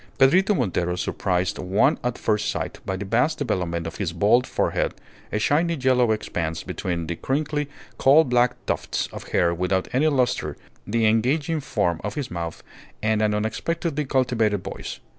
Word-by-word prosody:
Pedrito 185 +10 +5
Montero 90 - 0
surprised 90 0 -1
one 95 +3 +2
at 125 0 -1
first 105 -1 0
sight - - -3
by 95 - -1
the 100 - -5
vast 125 +10 +1
development 90 - -2
of 80 - -6
his 90 -5 -2
bald 105 +8 +3
forehead, - - 0 0.4
a - - 0
shiny 160 +10 +2
yellow 130 -4 +3
expanse 85 -7 -2
between 85 -2 -3
the 85 +1 -3
crinkly 145 - -1 0.3
coal 145 +4 +6
black 125 -2 +2
tufts - - -1
of - - -7
hair 85 -1 +2
without 90 +2 0
any 140 +5 +3
lustre, 130 -5 0 0.3
the 115 +2 +1
engaging 135 +9 +2
form 95 - -1
of 105 0 -4
his 135 -4 -4
mouth, 85 -1 -5 0.4
and 110 0 +2
an 105 -1 +2
unexpectedly 150 +8 -1
cultivated 120 -7 +1
voice. - - -6
110 Hz, 160 wpm, -24 LUFS, 95-135 Hz, 0.4 s, coal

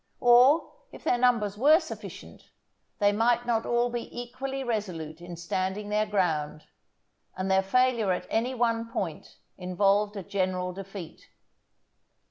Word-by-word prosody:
Or 250 +6 +5 0.2
if - - -12
their 245 - +1
numbers 220 -5 +2
were 305 +6 +6
sufficient, 320 - -10 0.5
they 205 -1 +3
might 235 +3 +2
not 230 -2 0
all 240 0 +1
be 240 -1 -4
equally 265 +3 -5
resolute 180 -9 -4
in 175 0 -8
standing 190 +4 -3
their 210 +1 +1
ground, 160 -7 -1 0.7
and 190 +1 -1
their 190 0 +4
failure 235 0 +2
at 180 - -2
any 245 +4 0
one 230 -1 0
point 165 -5 -5 0.2
involved 200 +3 +1
a 195 - -5
general 185 -1 -2
defeat. 195 -3 -9
210 Hz, 135 wpm, -27 LUFS, 185-240 Hz, 0.7 s, were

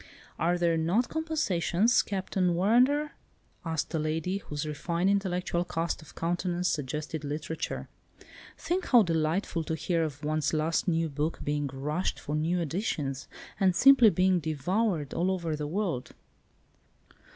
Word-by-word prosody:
"Are 175 +2 +2
there 170 -1 +2
not 180 +10 +1
compensations, 240 - +1
Captain 190 -2 -1
Warrender?" 250 - +3 0.5
asked 160 -1 -3
a 160 - +1
lady, 160 +5 -1
whose 150 -4 -5
refined, 170 +5 0
intellectual 180 -3 0
cast 170 -1 -2
of 155 - -15
countenance 175 +1 -1
suggested 150 +2 -3
literature. 150 +2 -4 0.7
"Think 360 +1 -2
how 240 -4 +6
delightful 165 +1 0
to 160 - -2
hear 165 +1 0
of 150 -2 -5
one's 155 0 0
last 160 +3 0
new 165 -1 +1
book 150 +2 -3
being 145 0 -1
rushed 150 +6 -2
for 150 - -5
new 160 +4 0
editions, 150 - -2 0.3
and 190 -3 +3
simply 265 -2 +7
being 185 -1 +2
devoured 160 - -1
all 180 +2 +1
over 170 -4 -1
the 150 -1 -4
world." 170 -7 -2
170 Hz, 140 wpm, -29 LUFS, 155-190 Hz, 0.7 s, simply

